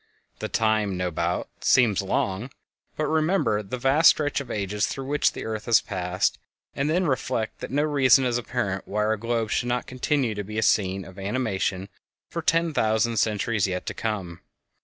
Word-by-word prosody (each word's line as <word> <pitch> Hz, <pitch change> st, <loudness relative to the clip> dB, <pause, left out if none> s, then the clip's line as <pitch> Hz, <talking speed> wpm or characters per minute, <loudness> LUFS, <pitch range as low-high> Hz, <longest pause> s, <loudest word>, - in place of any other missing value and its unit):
The -, -, -4 dB
time, 110 Hz, -3 st, +1 dB
no 90 Hz, -1 st, -1 dB
doubt, -, -, -2 dB
seems 115 Hz, -7 st, +3 dB
long, 95 Hz, +4 st, -1 dB, 0.5 s
but 155 Hz, -, 0 dB
remember 155 Hz, -, +1 dB
the 105 Hz, +5 st, -5 dB
vast 135 Hz, +6 st, +5 dB
stretch 145 Hz, -2 st, +1 dB
of 135 Hz, -, -10 dB
ages 105 Hz, -1 st, -1 dB
through 135 Hz, -, -5 dB
which 145 Hz, +2 st, +1 dB
the -, -, -6 dB
earth 110 Hz, -1 st, -4 dB
has 120 Hz, -2 st, +5 dB
passed, 90 Hz, 0 st, -1 dB, 0.3 s
and 140 Hz, +2 st, -1 dB
then 180 Hz, +4 st, +2 dB
reflect 130 Hz, -5 st, -1 dB
that -, -, -6 dB
no 145 Hz, +3 st, +1 dB
reason 135 Hz, -3 st, +4 dB
is 120 Hz, -1 st, +1 dB
apparent 110 Hz, -6 st, -3 dB
why 105 Hz, +1 st, -1 dB
our 110 Hz, +1 st, +2 dB
globe 115 Hz, 0 st, -2 dB
should 120 Hz, -, 0 dB
not 125 Hz, 0 st, -1 dB
continue 130 Hz, -2 st, 0 dB
to 105 Hz, 0 st, -4 dB
be 105 Hz, +2 st, -7 dB
a 110 Hz, -, +1 dB
scene 95 Hz, -2 st, +1 dB
of 95 Hz, 0 st, -12 dB
animation 100 Hz, -3 st, -2 dB, 0.4 s
for 170 Hz, -, -3 dB
ten 165 Hz, 0 st, +1 dB
thousand 110 Hz, -1 st, +1 dB
centuries 105 Hz, -1 st, +1 dB
yet 90 Hz, -1 st, -3 dB
to -, -, -3 dB
come. 95 Hz, -6 st, -4 dB
110 Hz, 185 wpm, -25 LUFS, 100-135 Hz, 0.5 s, vast